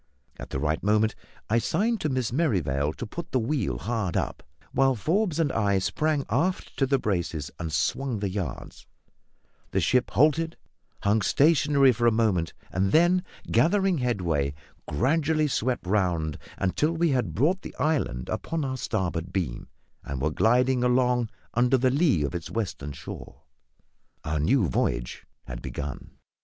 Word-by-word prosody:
At - - -7
the - - -3
right 75 +2 0
moment 105 +2 +2 0.3
I 115 +2 +3
signed 210 - 0
to 155 - 0
Miss 130 -4 -1
Merrivale 80 - +1
to 120 - -6
put 165 +10 -7
the 130 - +2
wheel 115 - -1
hard 105 - -2
up, - - -2 0.3
while 135 -1 +3
Forbes 170 - 0
and 155 -4 +2
I 100 -3 +1
sprang 150 +9 0
aft 165 - -1
to 135 - +2
the 135 +1 +3
braces 85 - -2
and 80 -2 -4
swung 110 - 0
the 100 0 -2
yards; 90 -9 -6 0.8
the - - 0
ship 125 0 +2
halted, 160 +3 +2 0.5
hung 105 +2 +3
stationary 140 - +4
for 120 0 +1
a - - +5
moment, 105 -7 +1 0.2
and 95 +2 +1
then, 175 +3 +4 0.3
gathering 190 0 +3
headway, 85 - 0 0.3
gradually 155 - +1
swept 130 -4 -1
round 90 -6 0 0.2
until 150 - +1
we 170 0 +1
had 120 - -1
brought 170 - +2
the - - -9
island 140 - 0
upon 165 -3 -2
our 130 -1 -3
starboard 90 -8 -2
beam 85 -11 -3 0.4
and 70 -1 -5
were 75 +4 0
gliding 125 +7 +3
along 125 -2 +2 0.2
under 125 +2 +3
the 130 0 +2
lee 140 - +3
of 70 - -2
its 85 -2 -5
western 90 -10 -3
shore. 70 - -9 0.8
Our 75 0 -1
new 105 - +3
voyage - - -2 0.2
had - - -7
begun. 70 -1 -6
120 Hz, 155 wpm, -26 LUFS, 85-145 Hz, 0.8 s, a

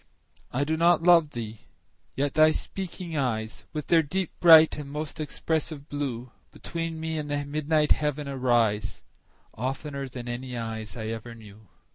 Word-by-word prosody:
I 135 +3 0
do 160 +2 -1
not 170 0 +4
love 170 -3 +6
thee!—yet 120 +3 -6
thy 155 0 +6
speaking 180 0 -5
eyes, 110 -6 -2
With 150 -2 -4
their 165 -1 +5
deep, 180 +4 -2
bright, 160 -2 +8
and 145 -2 -7
most 150 +2 -5
expressive 155 -1 -2
blue, 130 -4 -4 0.2
Between 165 -1 -5
me 160 0 -2
and 150 -1 -5
the 145 0 -1
midnight 150 +1 +1
heaven 150 -1 +1
arise, 120 -6 +1 0.5
15 115 - -9
Oftener 140 +1 -3
than 125 -1 -8
any 125 +1 -5
eyes 110 -1 -5
I 110 -1 -4
ever 115 +1 -6
knew. 110 -1 -15
145 Hz, 155 wpm, -27 LUFS, 120-160 Hz, 0.5 s, bright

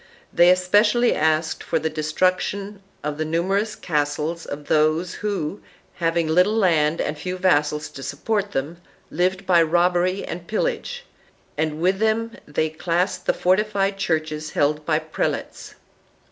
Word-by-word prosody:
They 175 +1 +6
espe 185 +2 +4
cially 235 +3 +3
asked 155 +1 0
for - - 0
the 160 - -1
destruction 185 +6 -1 0.2
of 150 0 -3
the - - +1
numerous 195 +7 0
castles 150 +1 -2
of 145 0 -6
those 155 +3 +2
who, 200 -4 -3 0.3
having 165 -1 0
little 180 +7 +3
land 165 -7 +2
and - - -1
few 185 +3 -4
vassals 150 -4 +1
to 135 - -10
support 205 +7 -2
them, 160 +5 -4 0.3
lived 185 +3 0
by 175 -2 +5
robbery 175 +3 +2
and 170 0 -7
pillage, 485 - -2 0.5
and 155 0 -2
with 185 +3 +1
them 220 +1 +1 0.2
they 155 +2 0
classed 180 +3 -1
the - - +4
fortified 195 +1 +1
churches 155 -4 -2
held 150 +1 0
by 155 -2 +3
prelates. 155 0 -4
175 Hz, 145 wpm, -22 LUFS, 155-195 Hz, 0.5 s, They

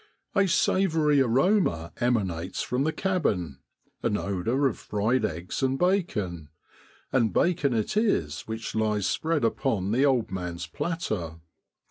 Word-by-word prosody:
A 200 -1 +3
savoury 160 -6 +3
aroma 130 - +2
emanates 95 -8 -1
from 125 +3 -1
the 160 - +1
cabin, 100 - -1 0.4
an 105 - +1
odour 100 +8 -1
of 130 - 0
fried 110 +5 0
eggs 85 +3 -3
and 135 0 +1
bacon, 105 - 0 0.6
and 115 -5 +2
bacon 155 - +2
it 110 - -1
is 205 - +1
which 110 0 -5
lies 105 -2 0
spread 155 - 0
upon 110 -5 0
the 125 +5 +3
old 130 -7 +2
man's 90 -2 -4
platter. 110 - -3
115 Hz, 130 wpm, -27 LUFS, 95-155 Hz, 0.6 s, A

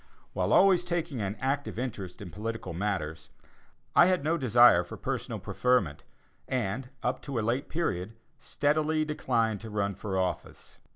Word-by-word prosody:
While - - 0
always 190 -3 +5
taking 170 -7 -2
an 100 +1 -2
active 140 0 -2
interest 100 -7 -5
in 90 - -9
political 110 -2 -5
matters, 80 -5 -3 0.7
I 175 - +8
had 185 -5 +1
no 160 +3 +2
desire 120 - +6
for 90 - -9
personal - - -3
preferment, 100 -13 0 0.5
and, 125 +1 -2
up 125 +1 -1
to 140 -4 -5
a 110 - 0
late 125 +4 -1
period, 110 - -2 0.2
steadily 155 +2 +1
declined 115 -8 0
to 110 - -8
run 100 -1 -1
for 95 0 -4
office. 95 -1 -4
115 Hz, 155 wpm, -29 LUFS, 100-145 Hz, 0.7 s, I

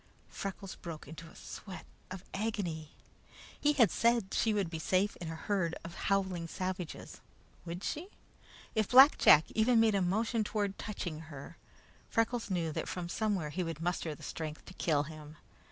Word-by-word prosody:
Freckles 195 -1 -5
broke 165 -5 -8
into 165 +2 -9
a - - -17
sweat 190 -3 -9 0.2
of 185 0 -7
agony. 190 -7 -2 0.7
He 295 0 +3
had 245 -7 +5
said 235 -4 +2
she 225 - +2
would 205 -4 +1
be 160 - -4
safe 185 +5 +1
in 170 -3 -6
a 160 - -4
herd 170 -1 -1
of 165 +1 -7
howling 190 -4 0
savages. 185 -1 -5 0.5
Would 175 +3 -5
she? 320 +5 -3 0.7
If 215 -2 +1
Black 265 +4 +9
Jack 155 +1 +7
even 225 +2 +4
made 225 -1 +5
a 200 - +2
motion 220 +5 +1
toward 205 -2 -2
touching 175 -7 -4
her, 145 +2 -9 0.5
Freckles 230 0 0
knew 170 -4 0
that - - -3
from 175 -1 -4
somewhere 195 -7 -1
he 180 - -2
would 165 -2 -4
muster 165 -2 -2
the - - -14
strength 155 -1 -5
to - - -11
kill 150 -5 +1
him. 155 0 -10
185 Hz, 170 wpm, -33 LUFS, 165-215 Hz, 0.7 s, Black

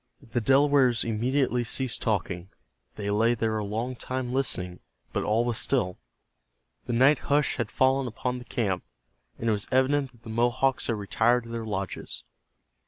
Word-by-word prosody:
The 120 +1 -2
Delawares 135 -1 +4
immediately 125 +3 +1
ceased 125 +1 -1
talking. 95 -4 -1 0.5
They 100 -1 -3
lay 115 +3 +3
there 110 -1 0
a - - -2
long 115 +5 -3
time 130 0 -4
listening, 90 -10 -1 0.3
but - - 0
all 115 +3 +2
was 120 -2 0
still. 95 -10 0 0.9
The 120 - -1
night 130 +3 +5
hush 145 0 +2
had 115 -3 -2
fallen 130 0 +2
upon 125 +2 -3
the 125 - -11
camp, 100 -8 -1 0.5
and 115 - -3
it - - +4
was 105 -1 -1
evident 135 +1 +2
that 120 -2 -24
the - - -9
Mohawks 120 +3 +1
had 115 - +1
retired 110 +4 +2
to 115 - -12
their 115 0 -4
lodges. 95 - -3
120 Hz, 170 wpm, -27 LUFS, 110-130 Hz, 0.9 s, night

